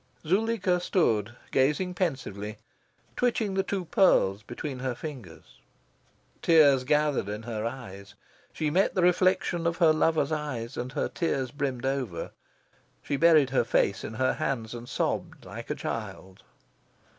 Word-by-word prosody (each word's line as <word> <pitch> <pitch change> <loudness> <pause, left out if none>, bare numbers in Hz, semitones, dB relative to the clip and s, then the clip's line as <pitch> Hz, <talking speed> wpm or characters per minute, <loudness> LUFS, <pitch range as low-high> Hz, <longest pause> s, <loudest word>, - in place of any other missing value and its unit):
Zuleika 190 0 +1
stood 115 - +1 0.2
gazing 150 +7 +1
pensively, 115 - -3 0.6
twitching 230 -5 0
the 195 - +2
two 190 -1 -3
pearls 135 - +3
between 125 +4 -6
her 130 -1 -2
fingers. 125 - -10 0.8
Tears 145 -6 +5
gathered 150 -6 +1
in 105 +2 -5
her 110 -1 -3
eyes. 100 -6 -9 0.4
She 155 -2 -2
met 190 +5 +2
the 185 - +2
reflection 180 -1 +2
of 170 0 -1
her 165 -4 +5
lover's 155 -1 +1
eyes, 140 -7 -3
and 125 +1 -4
her - - -1
tears 135 -7 -2
brimmed 135 -3 -3
over. 130 -10 -2 0.7
She 145 - -1
buried 155 -3 +5
her 130 - +3
face 100 -4 +1
in 110 - -6
her 130 +2 +1
hands, 115 -5 -3
and 120 0 -8
sobbed - - -2
like - - -8
a - - -1
child. 95 0 -6
140 Hz, 145 wpm, -27 LUFS, 115-170 Hz, 0.8 s, Tears